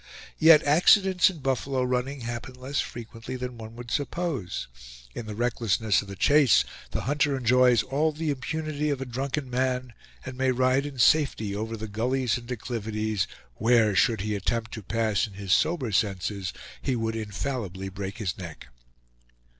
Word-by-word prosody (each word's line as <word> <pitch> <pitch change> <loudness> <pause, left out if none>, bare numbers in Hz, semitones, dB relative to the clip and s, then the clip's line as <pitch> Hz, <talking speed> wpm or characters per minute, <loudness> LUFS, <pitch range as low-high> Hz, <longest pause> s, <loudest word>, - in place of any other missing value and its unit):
Yet 160 0 +8
accidents 180 +5 +5
in 170 -6 -9
buffalo 135 0 0
running 125 +2 -1
happen 120 +2 -5
less 130 +3 -2
frequently 115 +1 -7
than 125 -1 -5
one 110 0 -9
would 120 -1 -9
suppose; 145 - -2 0.5
in 110 - -6
the 105 - -5
recklessness 115 -2 +1
of 100 - -11
the 100 - -7
chase, 140 +1 +5 0.3
the - - -2
hunter 145 +1 +1
enjoys 125 -2 +4
all 150 +4 +1
the 155 0 -2
impunity 150 +2 -2
of 140 -3 -1
a 135 - -4
drunken 135 +3 -3
man, 125 -1 -1 0.3
and 130 -1 -6
may 130 0 +1
ride 130 +2 +2
in 140 -2 -9
safety 120 -7 +3
over 110 +2 -3
the 110 +1 -5
gullies 120 +4 0
and 120 -1 -7
declivities 110 -4 -2 0.3
where, 115 -2 +3
should 110 -1 +3
he 105 +1 -2
attempt 110 +3 -2
to 110 - -6
pass 110 +1 0
in 105 - -14
his 95 -1 -1
sober 150 -9 +1
senses, 95 -1 -1 0.3
he 130 - 0
would 115 -1 -2
infallibly 105 -3 -4
break 95 0 -6
his 100 -6 -2
neck. 85 -8 -9
120 Hz, 165 wpm, -27 LUFS, 110-135 Hz, 0.5 s, Yet